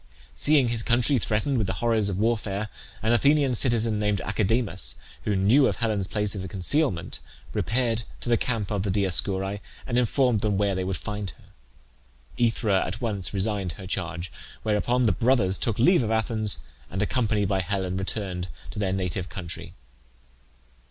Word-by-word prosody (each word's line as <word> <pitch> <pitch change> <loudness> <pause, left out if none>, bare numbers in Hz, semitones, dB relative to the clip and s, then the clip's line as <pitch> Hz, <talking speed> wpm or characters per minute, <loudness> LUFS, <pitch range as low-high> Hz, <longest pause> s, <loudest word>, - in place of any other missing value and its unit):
Seeing 145 -5 +3
his 115 -1 0
country 120 +4 +3
threatened 110 +5 0
with 105 - 0
the - - -1
horrors 110 -3 +1
of 95 - -2
warfare, 110 -1 0 0.3
an 110 - +2
Athenian 140 +1 +4
citizen 115 -3 +1
named 105 -2 +1
Academus, 100 - 0 0.3
who 105 - +1
knew 115 +9 +5
of - - 0
Helen's 105 -5 -1
place 105 0 -1
of 95 -3 -5
concealment, 95 - 0 0.3
repaired 115 -1 0 0.2
to - - -6
the 120 - +4
camp 115 -4 -2
of 105 -2 0
the 100 - -2
Dioscuri, 95 +1 +2 0.3
and 125 -1 +1
informed 125 -1 +3
them 105 -1 0
where 100 -1 +2
they 95 0 -1
would 95 -1 -2
find 105 +1 -4
her. - - -21 1.0
AEthra 110 -4 +2
at 115 - -5
once 105 -6 -2
resigned 100 -3 -1
her 95 - -10
charge, 85 -2 -3 0.3
whereupon 110 +4 +1
the 110 - +4
brothers 115 -6 +2
took 115 -3 0
leave 175 +8 +5
of 110 - -1
Athens, 110 - +1 0.3
and, 95 +2 -1
accompanied 105 -2 +1
by 95 -2 +1
Helen, 95 -1 -2
returned 95 -2 -2 0.2
to 105 - -6
their 95 -2 0
native 95 -1 -2
country. 85 -3 -6
105 Hz, 165 wpm, -26 LUFS, 95-115 Hz, 1.0 s, knew